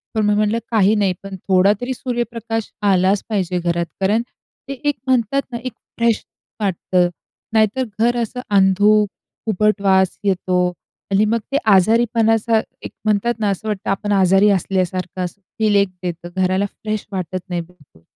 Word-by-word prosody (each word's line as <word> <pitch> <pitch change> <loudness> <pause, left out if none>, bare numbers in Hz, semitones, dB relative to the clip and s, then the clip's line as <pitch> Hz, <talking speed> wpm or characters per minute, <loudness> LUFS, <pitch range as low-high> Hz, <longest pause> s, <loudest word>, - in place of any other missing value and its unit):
पण 215 -1 +2
मी 210 - +3
म्हटलं 210 +2 +1
काही 215 -1 +4
नाही, 195 -3 +2
पण 195 -1 -7
थोडा 190 +2 +5
तरी 260 +1 -2
सूर्यप्रकाश 235 -3 -3 0.2
आलाच 190 +2 +2
पाहिजे 185 -4 -1
घरात. 170 0 -1 0.2
कारण 210 +4 +2 0.5
ते - - -2
एक 290 -1 +1
म्हणतात 255 +2 +2
ना, 235 - -3
एक 255 -3 -4 0.2
फ्रेश 230 -1 +1 0.4
वाटतं. 180 -2 +1 0.4
नाहीतर 220 +4 +2 0.2
घर 240 +1 +2
असं 240 +2 -4
अंधुक, 205 +1 +4 0.4
उबट 210 0 +1
वास 190 -1 +3
येतो 180 -2 +1 0.5
आणि 200 +2 +4
मग 230 +2 +1
ते 280 - +2 0.2
आजारीपणाचा 225 +2 +3 0.3
एक - - -6
म्हणतात 215 +3 +2
ना 210 -2 +1
असं 200 +3 -3
वाटतं 205 -3 -3
आपण 205 +1 -1
आजारी 195 +1 +4
असल्यासारखं 185 -1 -1
असं 200 +3 -9 0.2
फील 215 -2 +3
एक 200 -1 +3
देतं. 175 0 -5
घराला 185 +1 +1
फ्रेश 215 +1 -5
वाटत 185 -1 -3
नाही 175 -1 -1
बिलकुल. 165 - -19
205 Hz, 160 wpm, -19 LUFS, 185-220 Hz, 0.5 s, थोडा